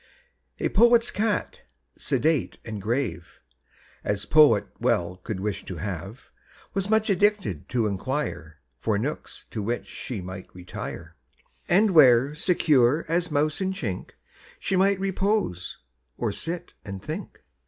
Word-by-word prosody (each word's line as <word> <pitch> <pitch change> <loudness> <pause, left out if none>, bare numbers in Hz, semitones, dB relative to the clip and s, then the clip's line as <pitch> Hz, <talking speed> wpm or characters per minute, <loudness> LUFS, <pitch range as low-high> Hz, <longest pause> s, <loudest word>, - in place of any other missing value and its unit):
A - - 0
poet's 235 +2 +5
cat, 210 -1 -1 0.3
sedate 160 -2 0
and 110 -3 -5
grave 105 -7 -2 0.6
As 105 -1 -1
poet 140 -10 +6
well 90 +1 +1
could 95 +1 -5
wish 100 0 -3
to 90 - -6
have, 95 - -6 0.4
Was 195 0 0
much 220 0 +3
addicted 200 - +1
to 120 -3 +1
inquire 100 - -3 0.2
For 105 +7 0
nooks 140 +9 -5
to 110 - -3
which 115 +4 -2
she 120 -5 -6
might 95 0 -8
retire, 90 0 -7 0.5
And 200 +4 +5
where, 135 -4 +6
secure 150 -4 +3
as 175 +2 +1
mouse 150 +3 0
in 190 0 0
chink, 100 - -5 0.4
She 195 - -1
might 195 +1 +3
repose, 195 - -1 0.4
or 115 -3 -1
sit 170 - -5
and 100 -2 -6
think. - - -7
130 Hz, 130 wpm, -26 LUFS, -, 0.6 s, poet